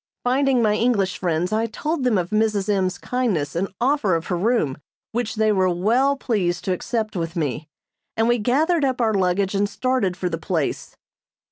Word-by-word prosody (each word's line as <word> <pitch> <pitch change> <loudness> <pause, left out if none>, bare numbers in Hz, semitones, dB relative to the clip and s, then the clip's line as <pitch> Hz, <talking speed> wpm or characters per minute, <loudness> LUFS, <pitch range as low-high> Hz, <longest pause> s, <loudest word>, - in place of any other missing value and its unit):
Finding 260 0 +2
my 210 -1 +3
English 210 -5 +1
friends 175 +2 -1
I 225 +1 +1
told 300 +6 -3
them 245 -5 +2
of 180 +1 -2
Mrs. 215 -2 +1
M.'s 190 -2 +1
kindness 205 - -1
and 185 +4 0
offer 245 - +2
of 165 +1 -3
her - - +2
room, 175 - 0 0.3
which 235 -1 -2
they 215 0 +2
were 190 -2 +2
well 235 +11 +2
pleased 190 -9 -1
to 185 - +1
accept 220 +3 -3
with 165 0 -3
me, 150 -1 -3 0.5
and 225 +1 +2
we 240 0 +2
gathered 300 +9 +2
up 260 -2 0
our 225 -2 +2
luggage 190 0 +1
and 200 0 +1
started 230 -5 -1
for 180 - -2
the 165 -2 -3
place. 160 -3 -2
210 Hz, 190 wpm, -22 LUFS, 180-245 Hz, 0.5 s, my